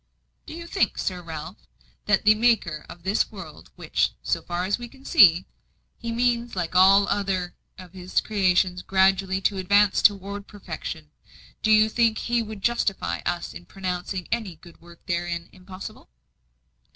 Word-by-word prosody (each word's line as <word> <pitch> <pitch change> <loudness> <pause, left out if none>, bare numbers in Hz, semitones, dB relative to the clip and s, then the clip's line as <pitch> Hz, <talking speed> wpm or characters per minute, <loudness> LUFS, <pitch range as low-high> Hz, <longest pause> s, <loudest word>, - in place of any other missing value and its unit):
"Do - - -8
you 340 0 -8
think, 380 +3 0
Sir 180 -2 -3
Ralph, 160 +1 -9 0.4
that 210 -1 +2
the 215 - +7
Maker 215 -9 +1
of 170 - -12
this 195 +3 +1
world - - -11
which, - - -1
so - - -1
far 175 +1 -3
as 200 +5 -1
we 240 - -7
can 270 +2 -19
see, 180 -3 +6 0.5
He 235 -1 -6
means 240 -1 0
like 180 -1 -3
all 195 +2 +6
other 190 -3 -1 0.2
of 185 -2 -12
His 185 -1 -1
creations 185 -3 +1
gradually 190 0 +2
to 195 0 0
advance 200 +2 +3
toward 200 0 +1
perfection 160 -6 -8 0.5
do 220 - 0
you 215 0 +6
think 225 0 +1
He 240 0 0
would 215 -3 -8
justify 235 -5 0
us 175 -1 -3
in 175 - -11
pronouncing 185 -1 -4
any 220 -7 -2
good 170 +1 -17
work 170 0 -17
therein 170 -1 -3
'impossible'?" 185 +1 -11
190 Hz, 160 wpm, -24 LUFS, 180-215 Hz, 0.5 s, the